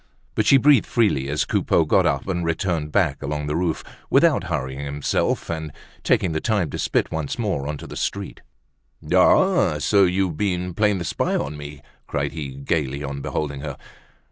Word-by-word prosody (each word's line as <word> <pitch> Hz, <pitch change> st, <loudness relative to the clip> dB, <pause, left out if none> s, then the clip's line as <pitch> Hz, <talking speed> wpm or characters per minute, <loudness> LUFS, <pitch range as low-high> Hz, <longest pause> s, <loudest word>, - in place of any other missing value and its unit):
But 110 Hz, -, 0 dB
she 135 Hz, -, +7 dB
breathed 140 Hz, -3 st, +5 dB
freely 100 Hz, -, +1 dB
as 75 Hz, +2 st, 0 dB
Coupeau -, -, +2 dB
got -, -, +3 dB
up 70 Hz, +3 st, -1 dB
and 90 Hz, -2 st, -1 dB
returned 85 Hz, -2 st, -1 dB
back -, -, +1 dB
along 75 Hz, +1 st, -3 dB
the 75 Hz, +1 st, -2 dB
roof, 85 Hz, -1 st, -1 dB, 0.3 s
without 140 Hz, -, +4 dB
hurrying 65 Hz, -6 st, -3 dB
himself, 70 Hz, 0 st, -1 dB
and 80 Hz, -2 st, -4 dB, 0.3 s
taking 90 Hz, -, +2 dB
the 80 Hz, -, -1 dB
time 105 Hz, -4 st, 0 dB
to -, -, -5 dB
spit -, -, 0 dB
once 80 Hz, -3 st, -3 dB
more 100 Hz, -, -2 dB
into 75 Hz, -2 st, -5 dB
the -, -, -9 dB
street. 100 Hz, -1 st, -4 dB, 0.7 s
"Ah! -, -, +5 dB
ah! 75 Hz, -, +4 dB
so 100 Hz, +6 st, +4 dB
you've 90 Hz, -3 st, 0 dB
been 90 Hz, -3 st, -1 dB
playing 105 Hz, +1 st, +2 dB
the 85 Hz, -, -4 dB
spy -, -, -1 dB
on 75 Hz, +2 st, -2 dB
me!" 75 Hz, -1 st, -9 dB, 0.2 s
cried 70 Hz, 0 st, -2 dB
he, 70 Hz, -5 st, -6 dB
gaily, 70 Hz, 0 st, -2 dB
on 70 Hz, 0 st, -5 dB
beholding 70 Hz, -1 st, -3 dB
her. 70 Hz, -2 st, -6 dB
80 Hz, 185 wpm, -23 LUFS, 70-95 Hz, 0.7 s, she